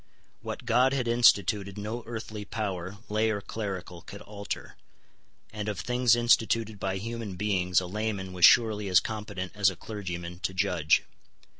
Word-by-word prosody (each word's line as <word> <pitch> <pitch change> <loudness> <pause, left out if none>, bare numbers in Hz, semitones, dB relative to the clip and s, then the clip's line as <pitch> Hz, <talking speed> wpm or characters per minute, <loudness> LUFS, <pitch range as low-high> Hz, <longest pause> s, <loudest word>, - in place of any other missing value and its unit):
What - - -6
God 125 +3 +3
had 130 -3 -1
instituted 105 -4 +3
no 110 +3 -4
earthly 110 -2 -6
power, 100 -3 -4
lay 110 +1 +1
or 105 -2 -1
clerical, 95 -5 -6
could 100 +3 -11
alter: 100 -1 -6 0.8
and 105 -1 -3
of 100 -3 -4
things 125 -2 +3
instituted 115 -2 +2
by 95 0 -2
human 115 -1 -5
beings 90 -2 +1
a 95 - -5
layman 100 -1 -3
was 90 -1 -4
surely 110 -2 +6
as 90 -1 +6
competent 105 -4 -5
as 100 -1 +3
a 95 - -7
clergyman 90 -3 -6
to 95 0 -3
judge. 80 -4 +2
105 Hz, 155 wpm, -28 LUFS, 95-110 Hz, 0.8 s, surely